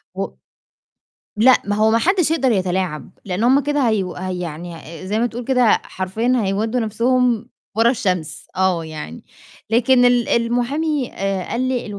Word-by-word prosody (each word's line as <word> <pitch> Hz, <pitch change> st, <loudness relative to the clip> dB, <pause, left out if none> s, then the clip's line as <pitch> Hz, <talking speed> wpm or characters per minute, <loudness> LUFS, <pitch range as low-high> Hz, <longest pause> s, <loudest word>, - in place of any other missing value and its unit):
و -, -, -2 dB, 1.1 s
لأ، 250 Hz, +4 st, +5 dB
ما 205 Hz, 0 st, -1 dB
هو 215 Hz, +1 st, +3 dB
ما 225 Hz, -, +4 dB
حدّش 355 Hz, -, +2 dB
يقدر 270 Hz, -6 st, +2 dB
يتلاعب، 185 Hz, -5 st, -2 dB
لإن 190 Hz, +2 st, -2 dB
هُم 260 Hz, +3 st, +5 dB
كده 285 Hz, -2 st, 0 dB
هيو 195 Hz, -4 st, -1 dB
ه 185 Hz, +1 st, -5 dB
يعني 175 Hz, -1 st, -5 dB, 0.3 s
زي 210 Hz, +3 st, 0 dB
ما 235 Hz, -, +2 dB
تقول 240 Hz, +1 st, -6 dB
كده 250 Hz, -2 st, +3 dB
حرفيًا 215 Hz, +7 st, -2 dB
هيودّوا 215 Hz, +5 st, -1 dB
نَفْسهم 235 Hz, +1 st, +1 dB, 0.3 s
ورا 225 Hz, +2 st, +4 dB
الشمس، 180 Hz, -10 st, -2 dB
آه 185 Hz, -3 st, +1 dB
يعني، 150 Hz, -, -8 dB, 0.5 s
لكن 245 Hz, +2 st, +4 dB
ال 245 Hz, -1 st, +3 dB
المحامي 250 Hz, +4 st, 0 dB
آآ، 195 Hz, -1 st, -2 dB
قال 235 Hz, -, -1 dB
لي: 255 Hz, -1 st, -1 dB
225 Hz, 155 wpm, -20 LUFS, 185-250 Hz, 1.1 s, لأ